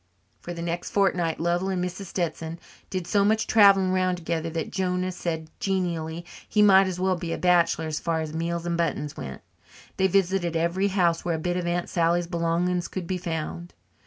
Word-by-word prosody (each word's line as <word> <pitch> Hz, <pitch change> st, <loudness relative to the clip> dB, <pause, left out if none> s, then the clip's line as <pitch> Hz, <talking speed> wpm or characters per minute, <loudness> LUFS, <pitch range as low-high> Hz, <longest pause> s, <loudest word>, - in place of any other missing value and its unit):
For 175 Hz, -, -8 dB
the 170 Hz, -1 st, -5 dB
next 170 Hz, +1 st, -3 dB
fortnight 180 Hz, -5 st, +1 dB
Lovell 175 Hz, +3 st, 0 dB
and 180 Hz, -2 st, -1 dB
Mrs. 180 Hz, +2 st, -6 dB
Stetson 165 Hz, -2 st, -3 dB, 0.3 s
did 185 Hz, -2 st, -3 dB
so 200 Hz, +3 st, +2 dB
much 220 Hz, +2 st, +2 dB
travelling 195 Hz, -3 st, +5 dB
round 185 Hz, -1 st, +1 dB
together 165 Hz, -1 st, -2 dB
that 160 Hz, -1 st, -4 dB
Jonah 185 Hz, -1 st, -1 dB
said 160 Hz, -3 st, -4 dB
genially 170 Hz, -3 st, -2 dB, 0.2 s
he 210 Hz, -, +4 dB
might 195 Hz, -1 st, +7 dB
as 180 Hz, -1 st, -4 dB
well 185 Hz, 0 st, +2 dB
be 170 Hz, -1 st, -5 dB
a -, -, -2 dB
bachelor 170 Hz, -2 st, +3 dB
as 155 Hz, -1 st, -2 dB
far 165 Hz, -1 st, -1 dB
as 155 Hz, -1 st, -4 dB
meals 170 Hz, +1 st, -2 dB
and 170 Hz, -1 st, -1 dB
buttons 150 Hz, -3 st, -1 dB
went. 65 Hz, -, -7 dB, 0.6 s
They 190 Hz, -, +3 dB
visited 190 Hz, -2 st, +1 dB
every 170 Hz, +4 st, +1 dB
house 175 Hz, -4 st, +1 dB
where 170 Hz, -2 st, 0 dB
a -, -, -2 dB
bit 175 Hz, +3 st, -2 dB
of 180 Hz, -1 st, -2 dB
Aunt 175 Hz, 0 st, -1 dB
Sally's 170 Hz, 0 st, +1 dB
belongings 170 Hz, +1 st, 0 dB
could 185 Hz, -2 st, -5 dB
be 185 Hz, +1 st, -2 dB
found. 170 Hz, +1 st, -5 dB
175 Hz, 195 wpm, -26 LUFS, 165-185 Hz, 0.6 s, might